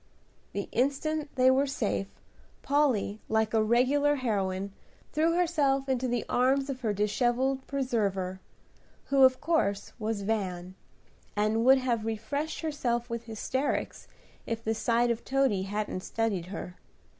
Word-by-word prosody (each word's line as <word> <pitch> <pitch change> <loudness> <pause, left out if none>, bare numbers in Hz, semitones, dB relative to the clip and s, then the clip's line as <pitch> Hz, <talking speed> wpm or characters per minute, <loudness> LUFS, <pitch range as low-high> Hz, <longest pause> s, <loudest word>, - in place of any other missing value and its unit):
The 200 - -3
instant 290 +4 0
they 255 0 +5
were 275 +2 +2
safe, 215 -7 -1 0.6
Polly, 260 -8 +1
like 220 0 +1
a 220 - +4
regular 260 +6 +3
heroine, 200 -6 -1 0.4
threw 325 +2 +2
herself 285 -6 +2
into 260 -1 0
the 240 -1 -1
arms 270 +2 +2
of 260 -1 -7
her 220 -4 0
dishevelled 240 +6 0
preserver, 200 -9 -1 0.7
who 275 -1 +3
of 260 0 +6
course 250 -12 0
was 215 -2 -2
Van, 185 -4 -2 0.6
and 215 +2 +1
would 265 +1 +7
have 245 -4 0
refreshed 280 +8 -3
herself 245 -6 -2
with 235 0 -4
hysterics 250 +5 -2 0.4
if 230 0 -3
the 225 - 0
sight 235 +2 +2
of 235 0 -3
Toady 270 -7 +1
hadn't 205 -2 -2
steadied 205 -4 -2
her. 180 -2 -7
240 Hz, 135 wpm, -29 LUFS, 210-270 Hz, 0.7 s, would